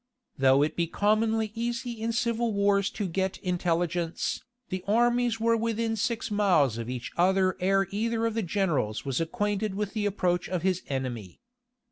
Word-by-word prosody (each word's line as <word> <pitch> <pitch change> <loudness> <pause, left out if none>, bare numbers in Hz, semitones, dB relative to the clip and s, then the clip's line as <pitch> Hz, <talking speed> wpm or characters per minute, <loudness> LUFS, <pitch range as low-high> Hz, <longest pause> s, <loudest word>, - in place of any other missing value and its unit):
Though 135 +1 +5
it 150 - -1
be 170 -1 0
commonly 215 +3 +1
easy 240 +2 -3
in 230 +1 0
civil 235 0 0
wars 200 -1 +2
to 205 - -3
get 190 +2 -1
intelligence, 175 -2 -1 0.3
the 185 -1 -4
armies 240 +1 +2
were 230 +1 +3
within 225 0 -1
six 225 +1 -2
miles 175 - +3
of 115 +1 -5
each 125 -1 -5
other 185 +1 +3
ere 195 +1 +2
either 225 +2 0
of 230 - 0
the 225 - 0
generals 170 - -1
was 135 +2 -1
acquainted 205 +2 -1
with 205 -1 -3
the 210 -2 0
approach 180 -3 0
of 180 -2 -2
his 185 -1 +1
enemy. 125 -8 -4
195 Hz, 165 wpm, -28 LUFS, 175-225 Hz, 0.3 s, Though